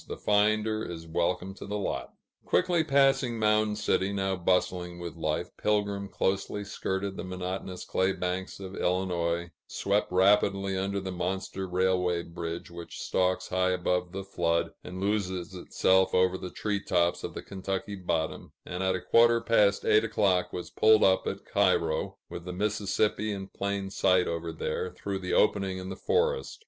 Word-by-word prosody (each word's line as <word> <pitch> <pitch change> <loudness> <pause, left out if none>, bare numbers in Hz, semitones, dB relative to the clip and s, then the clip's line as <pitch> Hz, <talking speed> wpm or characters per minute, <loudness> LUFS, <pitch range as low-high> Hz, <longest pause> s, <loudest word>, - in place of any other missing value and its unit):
The - - -5
finder 110 +1 +2
is 85 -1 -6
welcome 90 +3 -1
to - - -10
the 105 +1 -2
lot." 65 -10 -3 0.3
Quickly 175 -3 +2
passing 135 -4 +3
Mound 105 -1 +2
City, 100 -2 +1
now 95 -1 0
bustling 90 -1 0
with 85 -1 -6
life, - - -2
Pilgrim 100 -1 0
closely 100 +1 -1
skirted 95 -1 -3
the - - -4
monotonous 90 0 -5
clay 95 +1 +1
banks 90 0 -3
of 95 0 -7
Illinois, 85 -2 0 0.2
swept 100 0 0
rapidly 100 +1 +3
under 100 +1 -1
the 95 -1 -5
monster 95 +1 -3
railway 90 -1 +1
bridge 85 0 -6
which 85 -1 -8
stalks 95 0 0
high 95 0 +2
above 90 -1 0
the 95 +1 -5
flood, 85 -3 0
and 90 +1 -7
loses 95 -3 -1
itself 95 +1 +2
over 90 0 +3
the 90 -1 -5
tree 100 0 -2
tops 85 -1 +1
of - - -5
the - - -6
Kentucky 95 +1 -4
bottom, 85 -4 -3
and 90 +1 -4
at 95 0 +1
a 90 - -3
quarter 115 0 +5
past 105 -3 +3
eight 110 +1 +5
o'clock 100 -5 +1
was 90 - -6
pulled 110 0 +5
up 95 -1 +3
at - - -4
Cairo, 80 -1 +1
with 85 - -8
the 90 - -5
Mississippi 105 +2 0
in 95 -1 -5
plain 100 -1 -3
sight 95 -2 +3
over 85 0 -3
there, 80 +2 -3
through 100 +1 -4
the 90 -1 -3
opening 100 -3 +2
in 95 0 -6
the 95 - -5
forest. 470 - 0
95 Hz, 165 wpm, -28 LUFS, 90-100 Hz, 0.3 s, quarter